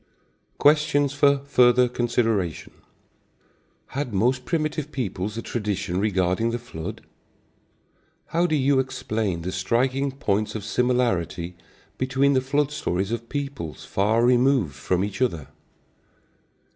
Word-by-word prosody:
Questions 145 -1 +3
for 140 0 +4
Further 125 -2 +5
Consideration. 115 -7 -1 1.2
Had 130 -6 -3
most 125 +6 +1
primitive 155 -2 -2
peoples 105 -5 -3
a 115 - -4
tradition 100 -5 -2
regarding 95 +1 +1
the 120 - -1
flood? 115 -10 -7 1.3
How 170 +2 +2
do 155 - +1
you 135 -1 +3
explain 110 -9 -2
the 90 - -3
striking 130 +8 0
points 110 -6 -1
of 105 - -4
similarity 100 -8 0 0.4
between 135 +2 +2
the 130 - +3
flood 145 +2 0
stories 95 -7 -2
of 115 0 -4
peoples 140 - -5
far 110 +4 +2
removed 125 - +3
from 90 +6 -1
each 100 +4 -4
other? 85 - -1
120 Hz, 120 wpm, -24 LUFS, 100-135 Hz, 1.3 s, Further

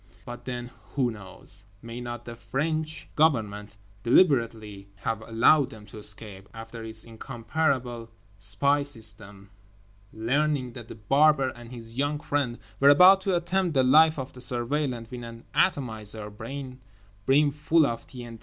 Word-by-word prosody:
But 120 -1 -8
then—who 120 0 -3
knows? 95 -2 -5 0.2
May 115 +1 -7
not 120 -1 -6
the 120 - -7
French 155 +6 -2
Government 105 -9 +1 0.2
deliberately 115 - +2
have 110 +2 -3
allowed 120 +6 +4
them 105 -1 -12
to 105 +1 -11
escape, 105 -2 -4
after—through 115 0 -8
its 110 -1 -5
incomparable 120 0 -2 0.3
spy 105 +9 +2
system—learning 105 +3 -3
that 120 -3 -9
The - - -9
Barber 135 +5 +3
and 120 0 -11
his 115 0 -7
young 145 +1 0
friend 140 -5 -1 0.2
were 140 - +7
about 185 +6 +8
to 190 -1 +1
attempt 175 -1 0
the 130 - +5
life 155 +5 +6
of 130 -2 -5
the 125 - -11
Surveillant 125 -1 -2
with 125 -1 -6
an 115 0 -9
atomizer 110 - 0
brim 130 +4 -7 0.7
full 150 +2 +3
of 115 -3 -3
T.N.T.? 120 -3 -9
120 Hz, 135 wpm, -27 LUFS, 110-140 Hz, 0.7 s, about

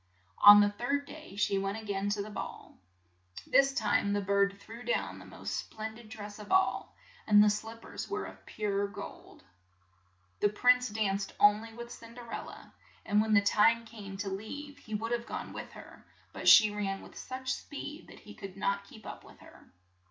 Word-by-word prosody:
On 205 0 +11
the 205 0 +3
third 280 +7 -1
day 305 -7 -11
she 200 -1 +1
went 195 +2 -2
a 220 - -10
gain 200 -1 -1
to 205 0 -1
the 210 - -9
ball. 205 - -8 0.7
This 275 0 +4
time 210 -4 +1
the 205 - +1
bird 200 0 +2
threw 225 +3 -11
down 240 - -1
the - - -12
most - - -5
splen 220 0 -5
did 225 -1 -14
dress 205 -1 -8
of 210 - -10
all, 380 0 +2 0.3
and 210 -1 +7
the 210 - +5
slip 225 +2 -6
pers - - -7
were 415 +1 -2
of - - -11
pure 200 -1 -1
gold. 200 - -10 1.0
The 205 - +3
prince 250 +4 +4
danced 200 -2 -1
on 205 +1 +6
ly 225 0 -10
with 235 +1 -8
Cin 230 0 -11
der 240 -1 -10
el - - -4
la, - - -12 0.3
and 205 +1 +3
when 215 0 +2
the 200 - +7
time 230 +3 +4
came 205 -4 -9
to 200 0 -3
leave, 285 +9 -7
he 215 -6 -6
would 225 +2 -3
have 235 0 -1
gone - - -5
with - - -7
her, - - -13 0.3
but - - -5
she 215 -2 +9
ran 195 -2 -3
with - - -14
such 260 0 -4
speed 295 +2 -8
that - - -14
he 210 - -12
could 195 -1 -9
not 200 0 -1
keep 220 -4 -15
up - - -8
with - - -16
her. - - -17
210 Hz, 205 wpm, -31 LUFS, 205-235 Hz, 1.0 s, On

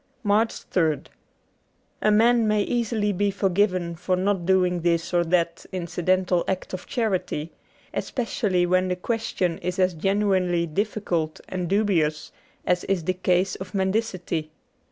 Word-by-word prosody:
'' - - -42 0.2
68 225 - -8
MARCH 220 +2 +1
3rd 160 -5 +1 1.0
A 215 - +3
MAN 230 +2 +4
may 210 -1 +2
easily 225 -3 0
be 200 +2 +1
forgiven 185 -3 +1
for 185 +3 0
not 185 -1 0
doing 180 -2 +3
this 170 0 0
or 175 -1 +4
that 170 -1 0
incidental 180 0 0
act 190 0 -3
of 185 - -6
charity, 185 - -1 0.4
especially 210 -7 0
when 185 +1 +2
the 180 - 0
question 185 -4 -2
is 180 +1 -3
as 185 -1 +2
genuinely 185 -1 +1
difficult 170 -3 -2
and 180 -2 -3
dubious 170 -7 +1 0.3
as 180 0 +1
is 190 -4 0
the 185 - 0
case 185 +1 +1
of 185 -1 -8
mendicity. 190 -5 -1
185 Hz, 145 wpm, -24 LUFS, 175-205 Hz, 1.0 s, MAN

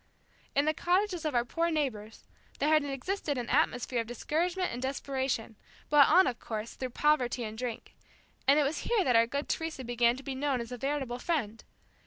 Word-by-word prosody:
In 285 +1 +3
the 310 - +2
cottages 360 0 0
of 300 -4 -1
our 240 0 +2
poor 335 +7 0
neighbors, 245 -9 -3 0.3
there 290 - +1
had 310 -1 +4
existed 285 +2 -3
an 240 -1 -3
atmosphere 250 -4 +1
of 225 - -8
discouragement 345 - -1
and 245 - -5
desperation, 265 -4 -2 0.3
brought 295 -2 +7
on 370 +4 +6
of 245 - -2
course, 220 0 -5
through 255 - -5
poverty 255 -3 +1
and 215 -1 -5
drink, 235 -1 -5 0.5
and 280 +2 +6
it - - +4
was 285 +3 -1
here 460 -5 +1
that 250 -6 +2
our 230 0 +5
good 280 +4 -3
Teresa 320 -5 -3
began 240 0 +2
to 270 - -10
be 275 - -4
known 270 -1 0
as 235 +1 -6
a 250 - -5
veritable 270 -2 -2
friend. 240 -9 -2
270 Hz, 200 wpm, -30 LUFS, 240-305 Hz, 0.5 s, brought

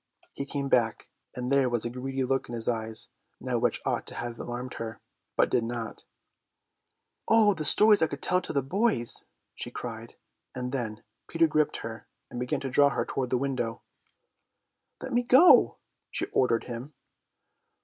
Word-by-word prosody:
He 140 - -5
came 140 -1 -3
back, 115 -4 0 0.2
and 125 +1 -4
there 135 -2 +3
was 120 -2 0
a - - -1
greedy 130 +2 -3
look 135 0 -1
in 120 - -5
his 115 -1 +2
eyes 110 -2 -1 0.3
now - - -2
which - - 0
ought - - -2
to - - -3
have 120 -1 -5
alarmed 125 +1 -6
her, 115 -1 -6 0.4
but - - +2
did 120 - +2
not. 115 -1 -6 1.2
"Oh, 220 -2 +5
the 160 -4 -5
stories 210 +6 +7
I 160 - +4
could 140 -2 -8
tell 180 0 +2
to - - -5
the 140 -3 0
boys!" 155 - +2 0.3
she - - -4
cried, - - -8 0.4
and 125 0 -4
then 110 -5 -4 0.2
Peter 165 0 +2
gripped 155 -1 +1
her 115 -1 -8 0.2
and 120 - -6
began 130 +3 -2
to 135 - -4
draw 145 +2 +5
her - - -2
toward 130 -2 -3
the 125 - +1
window. 130 -4 -3 1.2
"Let - - -5
me 240 - +3
go!" 260 +8 +6 0.3
she - - -2
ordered 115 -3 +2
him. 125 +4 -8
130 Hz, 175 wpm, -27 LUFS, 120-145 Hz, 1.2 s, stories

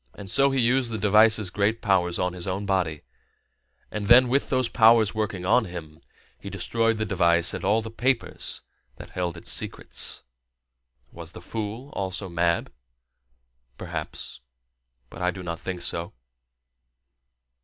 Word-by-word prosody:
And 95 -2 -8
so 140 0 +4
he 135 -1 0
used 125 0 +2
the 110 - -2
device's 105 -1 +4
great 105 +4 +1
powers 90 -5 +1
on 90 -1 -1
his 90 +1 -6
own 95 +2 -2
body; 90 -6 -1 0.9
and 105 -1 -4
then, 125 +2 +7
with 135 +3 +1
those 130 -2 +2
powers 115 -2 +5
working 105 -4 -3
on 125 +5 +4
him, 80 -4 -9 0.4
he - - -8
destroyed 115 -1 0
the 110 - -1
device 85 -3 +3
and - - -5
all 110 +3 +2
the 110 - -7
papers 125 +1 -1 0.3
that - - -12
held 90 -1 -3
its 85 - -1
secrets. - - -3 0.9
Was - - -10
the - - -9
fool 115 +5 -6
also 95 0 -4
mad? 85 0 0 1.1
Perhaps. - - -6 0.7
But - - -9
I 90 - +2
do 90 0 -6
not 85 -1 -4
think 90 -2 -5
so. 85 0 -3
100 Hz, 150 wpm, -25 LUFS, 90-115 Hz, 1.1 s, then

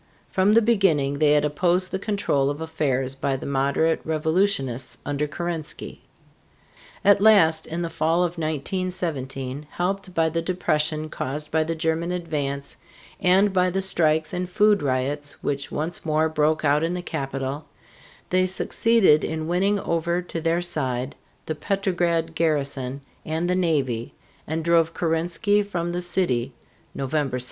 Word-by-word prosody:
From 195 +2 +3
the 230 - +6
beginning 165 -11 +2
they 150 -1 +5
had 150 0 +3
opposed 175 +5 +1
the 190 - -2
control 190 -10 0
of 145 +1 -4
affairs 140 -5 -1
by 135 0 -1
the 130 - -6
moderate 140 +4 +1
revolutionists 155 -5 0
under 145 +1 -1
Kerensky. 165 +1 -5 1.0
At 200 0 +6
last, 165 -7 +5
in 170 +2 -3
the 170 - -2
fall 165 +2 +1
of 175 - 0
1917, 150 -4 -3
helped 185 +1 -3
by 165 -1 +3
the 165 +1 -1
depression 155 -3 0
caused 150 0 -5
by 160 0 +2
the 165 +1 -3
German 160 +2 -1
advance 145 -6 -3 0.4
and 190 +1 +4
by 185 -1 +3
the 190 +2 -1
strikes 160 -4 +2
and 180 0 -2
food 210 +2 +3
riots 140 +2 -2
which 140 -1 -2
once 160 +3 -3
more 155 0 +2
broke 155 0 +1
out 145 +1 +3
in 165 +2 0
the 180 - -4
capital, 140 -1 -4 0.7
they 185 0 +3
succeeded 190 -3 +3
in 160 0 -3
winning 195 +4 +1
over 170 +1 0
to 170 -2 -5
their 165 +2 +1
side 130 -6 -2 0.3
the 155 - -2
Petrograd 170 -2 0
garrison 140 -5 -1 0.2
and 160 +2 -2
the 180 - +1
navy, 140 -10 0 0.3
and 160 +1 -3
drove 165 -1 +3
Kerensky 175 +5 +1
from 175 -4 -3
the 175 +1 -2
city 135 -9 0 0.4
(November 135 -1 -1
7). - - -3
160 Hz, 150 wpm, -24 LUFS, 145-180 Hz, 1.0 s, the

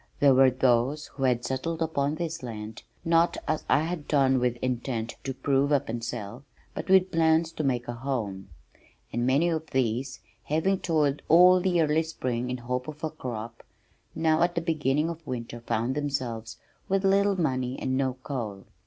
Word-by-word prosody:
There 140 -2 +6
were 130 0 +6
those 130 +3 +1
who 135 - -2
had 120 -2 +1
settled 160 +5 -2
upon 150 -3 0
this 165 0 -4
land, 110 -3 -7 0.2
not 165 +1 +3
as 155 0 -1
I 145 - +4
had 165 -2 -4
done 135 -3 +3
with 125 -1 +1
intent 120 -2 -3
to 135 - -3
prove 135 +2 +1
up 140 -5 +1
and 115 0 -4
sell, 120 +1 -6 0.3
but - - -6
with 190 -1 +5
plans 160 0 +3
to 155 - -4
make 125 -3 0
a 120 - -3
home, 115 -7 -4 0.6
and 120 +1 0
many 140 +6 +3
of 160 -1 -3
these, 130 +1 -1 0.3
having 180 +6 +1
toiled 150 -4 +1
all 180 +3 +7
the 180 -2 +1
early 155 +1 +2
spring 125 -6 -3
in 125 - -2
hope 125 +1 -3
of 155 0 -9
a 155 - -1
crop, 115 -5 -6 0.5
now 160 0 +2
at 175 0 +2
the 170 - 0
beginning 155 -2 0
of 165 -1 -7
winter 120 -1 -5
found 115 +2 -1
themselves 120 -6 -3 0.3
with 195 0 +1
little 195 0 +3
money 130 -5 -1
and 130 0 -1
no 130 -1 0
coal. 110 -9 -5
135 Hz, 180 wpm, -27 LUFS, 120-160 Hz, 0.6 s, all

